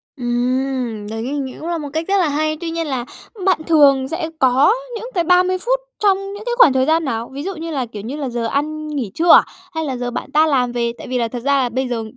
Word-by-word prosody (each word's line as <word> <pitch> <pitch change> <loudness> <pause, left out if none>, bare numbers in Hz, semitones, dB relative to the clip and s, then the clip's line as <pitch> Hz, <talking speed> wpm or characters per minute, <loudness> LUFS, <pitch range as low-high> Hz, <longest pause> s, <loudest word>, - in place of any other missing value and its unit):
Ừm, 245 -2 -1
đấy 225 0 -4
ng 275 +2 -3
cũng 320 - -6
là 340 - -1
một 295 -2 -5
cách 320 +1 -2
rất 400 +1 +2
là 360 -5 +3
hay. 310 +2 0
Tuy 340 - -3
nhiên 330 -1 -2
là 255 -4 -2 0.4
bạn 370 -4 +2
thường 280 -5 +5
sẽ 325 +2 -3
có 265 +7 +5 0.2
những 455 +1 -5
cái 350 - +1
30 365 +2 +3
phút - - 0 0.2
trong 400 -2 +4 0.2
những 410 +1 -8
cái 485 - -1
khoảng 345 - +7
thời 260 0 +2
gian 320 +2 +2
nào? 230 -3 -3
Ví 280 +2 -5
dụ 390 +1 -4
như 330 0 -6
là, 270 -4 -1
kiểu, 220 -3 -8
như 240 +8 -5
là 280 -3 -3
giờ 235 -1 -3
ăn 305 +5 -2
nghỉ 270 -9 -3
trưa 340 +1 +4
à? - - +9 0.3
Hay 320 - -1
là 265 -3 -3
giờ 245 0 -3
bạn - - -5
tan 310 +1 +4
làm 250 -3 +1
về? 235 -1 -1
Tại - - -9
vì 255 - -1
là 235 -2 0
thật 245 +1 -5
ra 280 0 +3
là 245 - -1
bây 255 +2 -2
giờ 235 -2 -2
280 Hz, 270 wpm, -19 LUFS, 245-330 Hz, 0.4 s, à